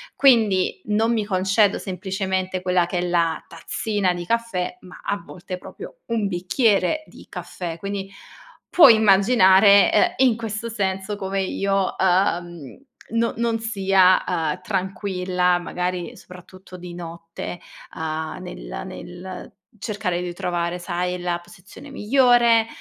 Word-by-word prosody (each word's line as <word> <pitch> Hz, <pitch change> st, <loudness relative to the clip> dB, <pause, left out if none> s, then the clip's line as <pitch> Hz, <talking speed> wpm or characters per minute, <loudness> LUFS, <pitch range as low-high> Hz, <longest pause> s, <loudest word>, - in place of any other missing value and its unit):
Quindi 215 Hz, -9 st, +3 dB
non 220 Hz, +2 st, +1 dB
mi 220 Hz, -3 st, 0 dB
concedo 200 Hz, +1 st, +2 dB
semplicemente 190 Hz, 0 st, -3 dB
quella 180 Hz, -1 st, +2 dB
che 175 Hz, +1 st, -3 dB
è -, -, 0 dB
la 170 Hz, -2 st, 0 dB
tazzina 190 Hz, +3 st, -2 dB
di 175 Hz, 0 st, -6 dB
caffè, 230 Hz, -2 st, -2 dB
ma 180 Hz, -1 st, -13 dB
a 200 Hz, -, -1 dB
volte 180 Hz, 0 st, -8 dB
proprio 185 Hz, -, -11 dB
un 225 Hz, -3 st, 0 dB
bicchiere 200 Hz, -, +1 dB
di -, -, -15 dB
caffè. 175 Hz, -1 st, -6 dB
Quindi, 195 Hz, +1 st, -5 dB, 0.6 s
puoi 320 Hz, -10 st, +8 dB
immaginare, 200 Hz, -2 st, +6 dB
ehm, -, -, +4 dB, 0.2 s
e -, -, +4 dB
in 245 Hz, -3 st, +3 dB
questo 225 Hz, 0 st, -4 dB
senso 195 Hz, -2 st, -2 dB
come 195 Hz, -1 st, -2 dB
io, 195 Hz, 0 st, -1 dB
uhm, 175 Hz, -, 0 dB, 0.3 s
no 230 Hz, 0 st, 0 dB
non 235 Hz, -1 st, 0 dB
sia, 195 Hz, -4 st, +3 dB
uhm, 160 Hz, -4 st, -1 dB
tranquilla, 185 Hz, -2 st, 0 dB
magari 180 Hz, 0 st, -4 dB
soprattutto 185 Hz, +1 st, -13 dB
di 175 Hz, -1 st, -9 dB
notte, 170 Hz, 0 st, -7 dB, 0.4 s
uhm, 160 Hz, 0 st, -4 dB
nel -, -, -7 dB
nel 180 Hz, +1 st, -9 dB, 0.3 s
cercare 200 Hz, -5 st, -2 dB
di 175 Hz, -1 st, -4 dB
trovare, 175 Hz, 0 st, -2 dB
sai, 180 Hz, 0 st, -3 dB
la 175 Hz, -1 st, -2 dB
posizione 180 Hz, +10 st, -14 dB
migliore, 240 Hz, -2 st, +4 dB
190 Hz, 130 wpm, -22 LUFS, 180-210 Hz, 0.6 s, puoi